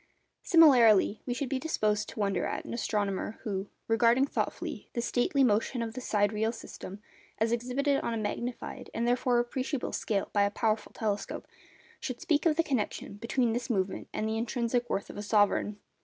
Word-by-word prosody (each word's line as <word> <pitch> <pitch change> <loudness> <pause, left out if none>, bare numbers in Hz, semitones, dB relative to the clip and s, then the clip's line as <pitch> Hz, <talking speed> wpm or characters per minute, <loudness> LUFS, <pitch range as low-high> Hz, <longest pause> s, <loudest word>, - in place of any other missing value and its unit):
Similarly, 240 - +6
we 245 - -1
should 280 +1 -2
be 265 0 -1
disposed 210 -8 0
to - - -9
wonder 200 -3 0
at - - -4
an - - -6
astronomer 210 -3 -1
who, 195 -2 -3 0.2
regarding 230 +3 +4
thoughtfully - - -3
the - - -2
stately 260 +3 +2
motion 230 +1 +2
of 225 -1 -5
the 255 - -6
sidereal 215 0 +1
system, 210 -3 -9 0.3
as 225 +1 +1
exhibited 255 +4 +1
on - - -2
a 230 - -1
magnified, 235 +3 -4
and, 235 +1 0
therefore, 245 0 +2
appreciable 255 +3 -1
scale 200 -4 -1
by 205 - +3
a 200 - +4
powerful 215 +1 -1
telescope, 210 -2 -3 0.5
should - - -5
speak 310 -1 +2
of 310 - +3
the 330 - +2
connection 255 -9 -2
between 230 +1 0
this 240 +2 -3
movement 190 -4 -1
and 215 - -2
the 220 0 -1
intrinsic 240 +1 -1
worth 200 - -2
of - - -11
a - - -3
sovereign. 205 0 +2
230 Hz, 180 wpm, -30 LUFS, 210-250 Hz, 0.5 s, Similarly